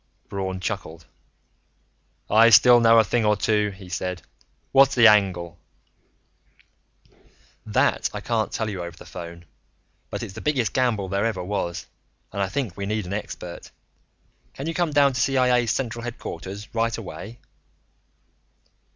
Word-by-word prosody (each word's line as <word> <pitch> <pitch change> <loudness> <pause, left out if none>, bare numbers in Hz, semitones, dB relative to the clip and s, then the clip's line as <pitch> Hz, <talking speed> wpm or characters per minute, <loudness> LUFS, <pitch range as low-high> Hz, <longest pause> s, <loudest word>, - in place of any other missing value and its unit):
Braun 95 -1 -4
chuckled. 85 -4 -5 1.2
"I 110 +2 +6
still 120 +2 +7
know 115 0 +6
a 115 - +7
thing 115 +3 0
or 105 0 +3
two," 105 0 +1
he 95 -1 -12
said. 90 0 -4 0.5
"What's 135 0 +5
the 120 -2 +6
angle?" 90 -5 +3 2.1
"That - - +1
I - - -5
can't - - -1
tell 110 - -2
you 95 -4 -4
over 85 -1 -7
the - - -13
phone. 85 -1 -9 0.6
But - - -5
it's 95 - -7
the - - -8
biggest 130 -9 0
gamble 120 -7 0
there 100 +4 0
ever 95 -5 -3
was, 90 -3 -3 0.5
and 100 - -2
I 95 - 0
think 120 -6 -3
we 100 -1 -5
need 105 -1 -2
an 90 - -5
expert. 90 -4 -7 0.9
Can 135 - -6
you 165 - -2
come 175 -1 0
down 140 -2 +4
to 125 - -1
CIA's 125 -3 +2
central 120 -1 -2
headquarters 100 -3 -7
right 115 0 0
away?" 115 +1 -8
105 Hz, 150 wpm, -24 LUFS, 95-120 Hz, 2.1 s, still